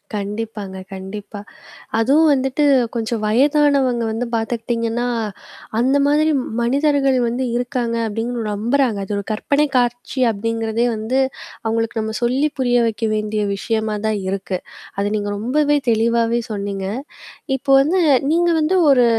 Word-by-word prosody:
கண்டிப்பாங்க, 205 -1 -5 0.2
கண்டிப்பா. 200 +2 -7 0.6
அதுவும் 290 +7 +4
வந்துட்டு 270 +2 0 0.3
கொஞ்சம் 225 -1 -2
வயதானவங்க 270 +1 +3
வந்து 225 +3 -2
பார்த்துக்கிட்டீங்கன்னா, 230 +1 -1 0.7
அந்த 260 +4 +3
மாதிரி 305 +2 +3 0.3
மனிதர்கள் 275 +1 +2
வந்து 245 +3 -1
இருக்காங்க 245 -1 -1
அப்பிடின்னு 230 +2 -3
நம்புறாங்க. 235 +2 +1
அது 205 - -4
ஒரு 200 - -3
கற்பனை 280 +7 +1
காட்சி 245 +2 -1
அப்பிடிங்கிறதே 225 +2 -1
வந்து 220 +5 -2 0.5
அவுங்களுக்கு 225 0 -1
நம்ம 220 0 -3
சொல்லி 255 +5 +2
புரிய 245 -1 +2
வைக்க 225 0 -2
வேண்டிய 215 0 -1
விஷயமா 220 +1 -1
தான் 215 -1 +1
இருக்கு. 190 -1 -2 0.4
அத 200 - 0
நீங்க 205 -1 -2
ரொம்பவே 290 +7 +2
தெளிவாவே 230 +1 +2
சொன்னீங்க. 200 -2 -3 0.7
இப்போ 275 - -2
வந்து 335 +7 +1 0.3
நீங்க 345 +1 +3
வந்து 315 +4 +1
ஒரு 250 -3 +5
235 Hz, 125 wpm, -20 LUFS, 215-265 Hz, 0.7 s, ஒரு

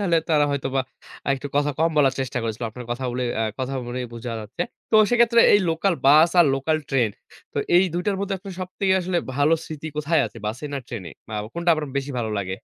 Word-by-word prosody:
তাহলে 175 -5 +2
তারা 150 -2 +4
হয়তোবা 135 -1 -1 0.5
আরেকটু 140 +1 -1
কথা 145 0 +2
কম 165 +1 +3
বলার 135 -3 +4
চেষ্টা 130 -1 -2
করেছিল, 115 +1 -4
আপনার 125 +2 -9
কথা 120 +2 -3
বলেই 125 0 -2
আ - - +2 0.2
কথার 130 0 -2
মনেই 125 0 -4
বুঝা 115 +1 -5
যাচ্ছে। 110 +10 -4 0.3
তো 220 - +5
সেক্ষেত্রে 235 -1 +5
এই 205 - +5
লোকাল 175 +3 +1
বাস 155 +4 +7
আর 170 - +6
লোকাল 145 +4 0
ট্রেন, 125 -5 +2 0.4
তো - - -2 0.2
এই 185 - +6
২ 175 - -1
টার 200 - +1
মধ্যে 200 0 -1
আপনার 190 0 -9
সবথেকে 190 +1 -1
আসলে 180 0 0 0.2
ভালো 145 +3 +4
স্মৃতি 155 0 -7
কোথায় 150 +1 +2
আছে? 110 - -12
বাসে, 115 +7 -4
না 140 - -1
ট্রেনে? 100 -9 -7 0.2
বা 110 - -6
অ - - -7
কোনটা 170 0 +1
আপনার 155 -2 -4
বেশি 140 +1 -4
ভালো 110 -2 -2
লাগে? 95 -2 -3
145 Hz, 225 wpm, -23 LUFS, 125-170 Hz, 0.5 s, বাস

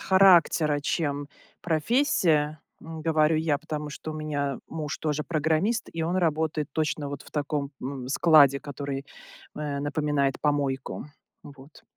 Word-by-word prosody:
характера, 175 -5 +5
чем 145 -2 -2 0.3
профессия, 160 - +1 0.2
ну, 160 0 -8
говорю 155 0 +2
я. 155 -2 +1
Потому 150 -1 -5
что 155 +1 -6
у - - -8
меня 145 -3 -2
муж 155 -3 -4
тоже 150 -1 -2
программист, 160 +9 0
и 165 - -3
он 170 +3 0
работает 155 -3 0
точно 155 -2 -1
вот 140 -1 -6
в - - -16
таком, 145 -1 -2
м, 130 -1 -5
складе, 140 -2 +5
который, 140 -1 -5 0.5
э, 150 -2 -3
напоминает 145 -2 0
помойку. 140 -3 -1 0.4
Вот. 140 +1 -14
150 Hz, 135 wpm, -26 LUFS, 145-160 Hz, 0.5 s, характера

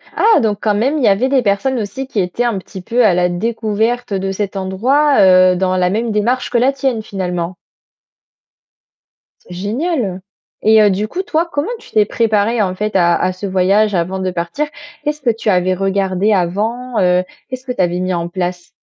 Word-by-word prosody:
Ah! 440 -5 +4
Donc 210 -4 0
quand 210 -2 +1
même, 265 +9 +1
il 275 - -1
y - - +4
avait 215 +7 +2
des 270 -2 +3
personnes 230 +5 0
aussi 220 +6 -5
qui 215 - -3
étaient 185 +6 -1
un 235 -5 0
petit 190 0 -9
peu 240 +6 +1
à 185 - +4
la 180 0 +2
découverte 225 +3 -1
de 195 0 -1
cet 200 0 -3
endroit, 250 +10 +1
heu, 185 -1 +6
dans 185 0 0
la 180 0 +2
même 225 +3 -1
démarche 230 +5 0
que 245 - +1
la 255 +3 +3
tienne 265 -5 -1
finalement? 180 -3 -4 1.9
C'est 180 - -12
génial. 210 - -2 0.4
Et 220 0 +5
heu 205 - +5
du 205 +3 -1
coup 375 - -4
toi, 340 -2 -1
comment 290 +8 -2
tu - - -17
t'es 215 - +4
préparé 220 0 +1
en 185 -2 -1
fait 210 +2 -3
à 170 -1 +3
à 185 - 0
ce 185 +2 -7
voyage 195 +2 +2
avant 180 +3 -1
de 185 0 -1
partir? 175 - -3 0.4
Qu'est-ce 300 0 -2
que 245 - +1
tu 225 -1 -1
avais 185 0 +2
regardé 195 +1 0
avant? 220 +7 -1
Heu, 180 0 +3 0.3
qu'est-ce 255 0 -6
que 250 - -3
tu 245 - -1
avais 175 0 0
mis 185 0 -1
en 170 0 -2
place? 180 -1 -4
205 Hz, 205 wpm, -16 LUFS, 185-240 Hz, 1.9 s, heu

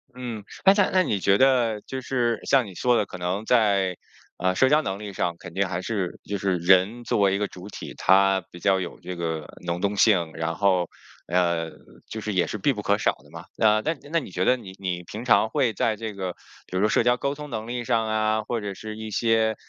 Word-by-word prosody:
嗯， 120 -5 -6 0.2
哎 195 +1 +7
在 205 -2 +3
那 185 -1 +4
你 105 - -1
觉 100 +1 +3
得 120 -5 +3
就 130 - -6
是 120 -3 0
像 135 -3 +3
你 95 - -10
说 125 +6 +2
的 105 - +1
可 90 - -9
能 90 +4 -2
在， 100 -6 +2 0.4
呃， 95 +1 0
社 130 +7 +4
交 150 +1 +4
能 95 -6 -4
力 105 -1 -6
上 85 -2 -1
肯 85 - -11
定 95 +1 0
还 90 0 -3
是 95 -4 -3
就 100 - -3
是 95 -2 0
人 95 +7 +3
作 120 -2 0
为 100 -1 +3
一 - - 0
个 105 0 -1
主 90 +1 -11
体， 105 - -8
他 95 0 +4
比 85 - -11
较 95 +1 +2
有 90 -2 -6
这 90 0 -6
个 80 -2 -3 0.2
能 85 0 -2
动 100 0 0
性， 90 -8 +3
然 80 +1 -3
后， 95 -3 +2 0.4
呃， 85 -2 +1 0.4
就 110 - -6
是 105 -1 -3
也 90 - +2
是 105 - -4
必 140 +8 +2
不 105 - -5
可 100 +1 +2
少 - - +1
的 - - -20
嘛。 - - -9
呃， 110 0 +4
那 160 +6 0 0.2
那 165 - +3
你 100 - -9
觉 90 +1 -1
得 125 - +5
你 95 -5 -10
你 90 -2 -3
平 110 +7 -8
常 110 -2 +4
会 130 -6 +1
在 110 +2 0
这 110 -1 -5
个 95 -3 -4 0.3
比 90 - -4
如 - - +1
说 105 - +3
社 - - +3
交 120 0 +3
沟 140 +2 -2
通 150 0 -8
能 110 -2 -5
力 120 0 -3
上 115 -2 +1
啊， 110 0 +1
或 115 0 -3
者 100 -1 -4
是 110 +2 -8
一 110 0 -6
些， 110 0 +2
105 Hz, 265 characters per minute, -25 LUFS, 95-115 Hz, 0.4 s, 哎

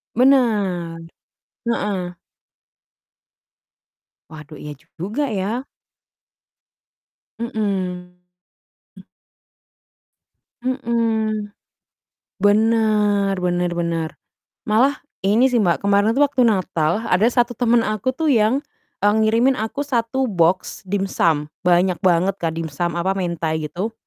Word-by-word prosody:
Benar, 210 -10 +2 0.7
heeh. 195 -6 -2 2.2
Waduh, 150 -1 -11
iya 150 0 -6
juga 195 - -4
ya? 220 +3 -2 1.7
Mhm. 185 -6 -3 2.4
Mhm. 230 -4 -1 0.9
Benar 210 -2 +2
benar 180 -1 0
benar. 165 -2 -1 0.6
Malah 250 +6 +3 0.2
ini 210 +6 +3
sih 240 -2 +3
Mbak, 180 0 +1
kemarin 200 +1 +3
tuh 290 - +6
waktu 280 -2 -1
Natal 185 -1 0
ada 195 +5 +3
1 245 0 +1
temen 240 -1 +2
aku 215 +3 -1
tuh 320 -1 +1
yang, 230 +4 +2 0.4
e 205 - +3
ngirimin 220 +5 +3
aku 225 +7 -3
1 260 0 0
boks 180 -1 +1
dimsum. 175 -6 +1 0.2
Banyak 180 -1 +2
banget 185 +1 +2
Kak 165 -1 -2
dimsum 165 +1 -3
apa, 190 +3 0
mentai 170 -4 -2
gitu 205 +8 -4
205 Hz, 95 wpm, -21 LUFS, 175-230 Hz, 2.4 s, tuh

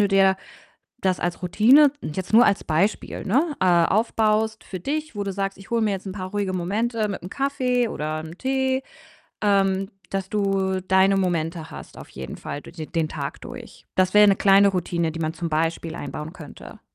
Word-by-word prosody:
du 205 - +4
dir 195 -1 +4 0.7
das 185 -1 +1
als 175 +1 -2
Routine 260 - +5
jetzt 185 +6 -5
nur 235 +3 +7
als 200 - +1
Beispiel, 175 +7 -1
ne, 290 - +2
äh, - - +2
aufbaust 215 +5 +2
für 185 - -7
dich, 305 - -3
wo 205 - -3
du 195 - -3
sagst: 195 -1 -3
„ich 195 - -14
hole 235 -1 +1
mir 215 - +2
jetzt 195 0 -5
'n 190 - -4
paar 185 -2 -6
ruhige 200 -2 -2
Momente 215 +5 -1
mit 200 - -4
'm 180 - -7
Kaffee 250 -2 0
oder 155 -4 -3
'nem 160 +3 -10
Tee“, 265 0 0 0.6
ähm, 195 -1 +2 0.2
dass 195 -1 -3
du 195 -2 0
deine 190 +1 +4
Momente 165 -3 -1
hast - - -10
auf - - -11
jeden 65 0 -8
Fall 145 - -6
dur - - -12
de 160 -2 -7
den 165 -1 -1
Tag 140 -2 -5
durch. - - -10
Das 185 0 +3
wäre 210 0 +8
'ne 195 - +5
kleine 200 0 +5
Routine, 170 -3 -1
die 165 - -6
man 160 +1 -2
zum 170 0 -3
Beispiel 165 +1 -1
einbauen 150 +2 -6
könnte. 160 -6 -12
195 Hz, 200 wpm, -23 LUFS, 175-215 Hz, 0.7 s, wäre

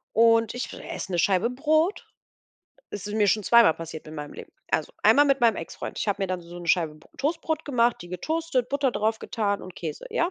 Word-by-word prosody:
Und 230 0 +4
ich 245 +1 -4
esse 190 - -7
'ne 175 - 0
Scheibe 195 +5 +2
Brot. 310 +8 +1 0.8
Es 205 0 -6
ist 210 - -4
mir 210 -1 +3
schon 215 +2 +2
zweimal 230 -5 +6
passiert 160 -1 -8
in 155 - -9
meinem 150 -1 -7
Leben. - - -11 0.2
Also, - - 0
einmal 290 - +6
mit 275 -1 +2
meinem 230 -3 +4
Exfreund. 165 - -7
Ich - - -2
habe 200 0 0
mir - - +1
dann 185 -1 -3
so 170 +1 -11
'ne 175 - -9
Scheibe 165 -4 +2
Br 155 - -20
Toastbrot 315 +2 -1
gemacht, 240 -4 +2
die 175 - -11
getoastet, 260 - -1
Butter 280 -1 +1
drauf 220 +1 0
getan 205 -3 -2
und 185 - -10
Käse, 155 -3 -6
ja? 340 - 0
220 Hz, 220 wpm, -26 LUFS, 180-270 Hz, 0.8 s, zweimal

